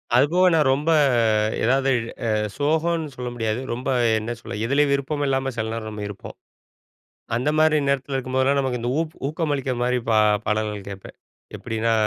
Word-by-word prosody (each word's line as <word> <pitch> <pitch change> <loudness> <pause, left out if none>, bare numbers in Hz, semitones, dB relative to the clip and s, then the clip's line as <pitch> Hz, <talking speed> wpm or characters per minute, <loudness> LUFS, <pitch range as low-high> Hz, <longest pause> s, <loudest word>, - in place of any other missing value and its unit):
அது 130 +3 +6
போக 185 +1 +4
நான் 150 -4 +3
ரொம்ப 150 +4 0 0.7
எதாவது 135 +3 +2 0.4
அ - - +1 0.3
சோகம்னு 160 +2 0
சொல்ல 125 -1 -4
முடியாது. 115 0 -2
ரொம்ப 125 +3 -4 0.3
என்ன 115 +3 -4
சொல்ல - - -7
எதுலேயும் 140 +3 +2
விருப்பம் 145 +1 -1
இல்லாம 135 0 0
சில 110 0 -2
நேரம் 110 -1 -5
நம்ம 105 -1 -6
இருப்போம். 100 -1 -9 1.0
அந்த 130 +5 0
மாரி 155 0 +4
நேரத்தில 140 0 -1
இருக்கும்போதெல்லாம் 130 +2 +1
நமக்கு 130 -3 -1
இந்த 120 - -1
ஊ - - +3 0.3
ஊக்கம் 155 0 -2
அளிக்கிற 135 -2 -2
மாரி 125 0 +1
பா 110 - +4 0.3
பாடல்கள் 105 -2 -2
கேட்பேன். 95 -1 -10 0.4
எப்டின்னா, 115 0 -1
130 Hz, 165 wpm, -23 LUFS, 115-145 Hz, 1.0 s, அது